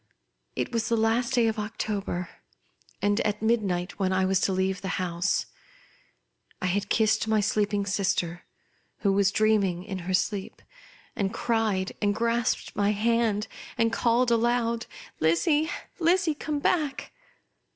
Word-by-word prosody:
It - - -2
was 230 -1 0
the 230 - +2
last 235 +3 +1
day 240 -2 +4
of 220 -1 0
October, 205 -4 -3 0.8
and 205 +1 +2
at 210 0 -1
midnight, 200 -6 0
when 190 -1 +1
I 185 0 +2
was 190 0 +2
to - - +2
leave 190 +1 0
the 195 - -4
house. 180 +1 0 1.1
I - - -3
had 195 +2 0
kissed 220 0 +2
my 220 -1 +3
sleeping 205 -1 +1
sister, 180 -3 -1 0.6
who 200 -2 +2
was 200 0 +3
dreaming 200 -5 +2
in 190 -1 -5
her 185 +1 -4
sleep, 195 +1 -2 0.5
and 200 -5 -1
cried, 220 -5 0
and 205 -1 +2
grasped 235 +1 0
my 205 0 +2
iiand, 220 0 +1 0.5
called 235 +1 +2
aloud, 235 0 +1 0.2
" - - -20
Lizzie, 295 - +2 0.3
Lizzie!, 345 -1 +3
Come 300 0 -3
back 295 -1 0
210 Hz, 140 wpm, -27 LUFS, 190-230 Hz, 1.1 s, day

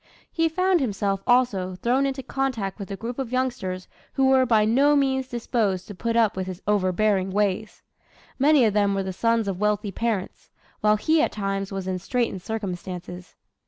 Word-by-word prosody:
He 330 -1 +1
found 370 +2 +2
himself, 200 -6 -1
also, 210 -7 +2
thrown 250 +8 +1
into 265 -1 -4
contact 235 -9 -2
with 200 - -7
a 200 - -4
group 235 +5 -6
of 255 -3 -3
youngsters 245 -8 -2 0.3
who 265 -1 +3
were 260 -1 +4
by 220 -3 +4
no 275 +7 +4
means 265 -2 +1
disposed 220 -6 -1
to 205 - -7
put 230 +4 -2
up 225 -4 +3
with 185 0 -3
his 185 -1 -6
overbearing 195 -1 +1
ways. 205 +2 -1 0.6
Many 285 -2 +5
of 215 - +2
them 200 -1 +2
were 195 - -1
the 190 0 -4
sons 230 +2 +1
of 190 -2 -3
wealthy 210 -1 0
parents, 220 -2 -3 0.3
while 210 0 +4
he 315 +8 +2
at - - +1
times 195 -1 -3
was 195 -1 -4
in 185 -1 -2
straitened 230 -1 -2
circumstances. 180 -4 -6
215 Hz, 185 wpm, -24 LUFS, 195-255 Hz, 0.6 s, Many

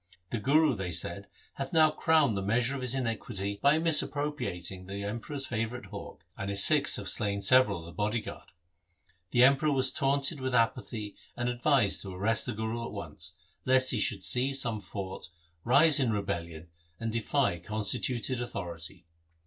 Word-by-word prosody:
' 90 0 -46
The 115 - -2
Guru,' 145 +5 +3
they 95 -5 -4
said, 85 +3 0
' - - -32
hath 135 +5 -5
now 155 -1 +5
crowned 155 -8 +2
the 95 - -2
measure 120 +6 0
of 135 - -5
his 130 0 -1
iniquity 105 -5 -4
by 140 +2 +4
misappropriating 145 - -1
the 100 +1 -6
Emperor's 120 +7 -3
favourite 115 0 -4
hawk, - - -10
and 100 - -5
his 100 0 +7
Sikhs 150 -2 +5
have 100 - -5
slain 100 -1 0
several 130 -1 +5
of 85 - -10
the 85 - -10
bodyguard.' 105 +3 -4 0.8
The 120 +4 +4
Emperor 140 +3 +4
was 130 -2 +2
taunted 140 +2 0
with 130 -1 -2
apathy 115 -3 -1 0.2
and 120 0 -2
advised 125 -3 +1
to 95 -2 -8
arrest 110 +4 +1
the - - -2
Guru 110 +2 -4
at - - -7
once, 85 -3 -7 0.3
lest 130 0 +4
he 120 - -1
should 100 -3 -1
seize 135 +5 +3
some 115 -4 -1
fort, 95 -2 -7 0.3
rise 145 +5 +5
in 125 -4 +1
rebellion 85 -5 -4 0.3
and 115 0 -3
defy 115 -4 0
constituted 115 +6 -2
authority. 90 -5 -7
115 Hz, 175 wpm, -29 LUFS, 100-135 Hz, 0.8 s, his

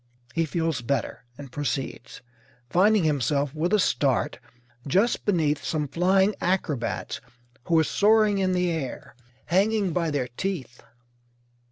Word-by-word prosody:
He 165 - +1
feels 160 -4 -1
better 125 0 -2
and 140 -3 -10
proceeds, 135 -4 -4 0.5
finding 205 +2 +4
himself, 140 -1 0
with 160 +4 -1
a 215 - +4
start, 140 - +1 0.5
just 200 - +1
beneath 160 -7 +1
some 150 -2 -1
flying 190 +6 +2
acrobats 160 -11 -2 0.4
who 165 - +2
are 160 - +5
soaring 210 +3 +3
in 185 -1 +1
air, 170 -7 -3 0.3
hanging 195 +1 +1
by 170 -1 0
their 140 -4 -1
teeth. 130 -4 -5
165 Hz, 125 wpm, -25 LUFS, 140-190 Hz, 0.5 s, are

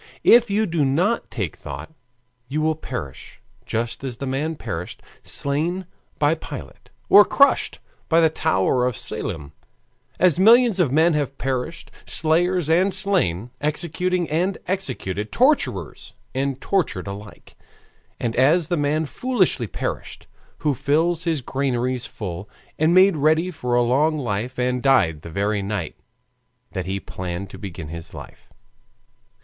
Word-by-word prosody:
If 235 -1 +6
you 210 +2 +2
do 165 -5 0
not 175 +12 +1
take - - -3
thought, 160 - -8 0.5
you 150 +5 -2
will 160 +1 +2
perish 125 - -7 0.3
just 115 +3 -2
as 125 -3 -4
the 140 - -5
men 145 +5 -2
perished, 90 - -6 0.2
slain 165 +7 -1 0.3
by 145 +1 +3
Pilate, 165 - -9 0.2
or 205 - +9
crushed 280 +6 +3 0.3
by 165 - +5
the 165 - +6
tower 125 -4 +1
of 125 - -2
Siloam; 80 -9 -5 0.7
as 180 -2 +3
millions 230 0 +6
of 160 -8 +3
men 160 +4 +4
have 140 -2 -2
perished, 135 +5 -3
slayers 170 +1 +1
and 180 +5 +3
slain, 150 - 0
executing 175 +4 -1
and 175 +4 0
executed, 125 - -3
torturers 275 +5 0 0.2
and 135 0 -1
tortured 180 - -1
alike, 100 +1 -10 0.6
and 115 -1 -2
as 150 +6 +3
the 175 - +1
man 150 +2 +1
foolishly 180 - 0
perished, 85 - -5 0.4
who 150 - +3
filled 160 +6 +1
his 165 -6 -1
granaries 130 -2 -1
full 95 -2 -6 0.3
and 160 +3 +3
made 190 0 +6
ready 160 +5 +2
for 125 -6 -2
a 120 - +4
long 145 +6 +2
life 120 -1 -3
and 125 0 0
died 95 - +3
the 85 - -9
very 100 +4 -1
night 100 -5 -3 0.8
that - - -4
he 95 +1 -2
planned 90 +1 -6
to - - -10
begin 85 -6 -7
his 85 0 -8
life. - - -12
145 Hz, 145 wpm, -22 LUFS, 115-170 Hz, 0.8 s, or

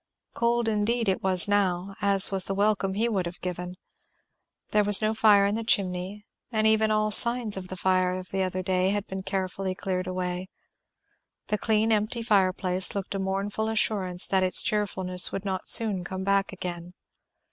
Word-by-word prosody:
Cold 235 0 0
indeed 225 +2 -1
it 190 - 0
was 185 -1 +3
now, 195 -2 0
as 200 -1 +5
was 190 -1 0
the 195 - -3
welcome 200 -1 0
he 225 +3 0
would 195 -6 -2
have 170 - -9
given. 180 0 -6 1.0
There 210 0 +3
was 205 -1 +5
no 215 0 0
fire 210 -2 +4
in 200 - 0
the 225 +1 -3
chimney, 195 0 -1 0.3
and 220 -2 0
even 220 0 +3
all 215 0 +1
the - - +8
signs 235 -3 +3
of 190 -1 -6
the 185 - -8
fire 185 0 +1
of 185 0 -6
the 195 - -2
other 185 0 -3
day 185 0 0
had 205 0 -2
been 190 0 -6
carefully 190 0 -4
cleared 185 -1 -4
away; 180 0 -4 1.0
the 210 - 0
clean 220 +1 +1
empty 215 +2 -1
fireplace 190 -3 +1
looked 200 -1 -4
a 195 - -3
mournful 195 +3 -3
assurance 195 -5 0
that 190 -1 +1
its 185 0 +5
cheerfulness 185 -4 0
would 195 - -6
not 190 -1 0
soon 210 -5 +1
come 190 +2 -6
back 200 0 0
again. 180 -2 -7
195 Hz, 185 wpm, -26 LUFS, 185-210 Hz, 1.0 s, the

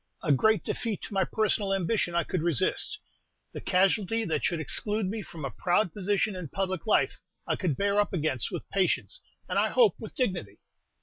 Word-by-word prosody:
A 150 - +2
great 220 +11 +3
defeat 225 -4 -3
to - - -6
my 195 -1 +3
personal 205 -2 0
ambition 185 -1 0
I 170 - +3
could 180 - -2
resist. 165 -5 +1 0.5
The - - -7
casualty 195 +4 +2
that 155 -3 -1
should 170 -3 +1
exclude 210 +7 +1
me 215 +4 -3
from 165 -6 -8
a 135 - -3
proud 180 0 +1
position 205 +1 0
and 180 -6 -7
public 190 -2 -2
life, - - +2 0.2
I - - 0
could 170 -8 -1
bear 200 0 +2
up 205 - +2
against 155 -8 0
with - - -5
patience, 195 - 0 0.3
and - - 0
I - - +2
hope 475 -4 +5
with - - -9
dignity. 180 - -2
190 Hz, 190 wpm, -28 LUFS, 170-210 Hz, 0.5 s, hope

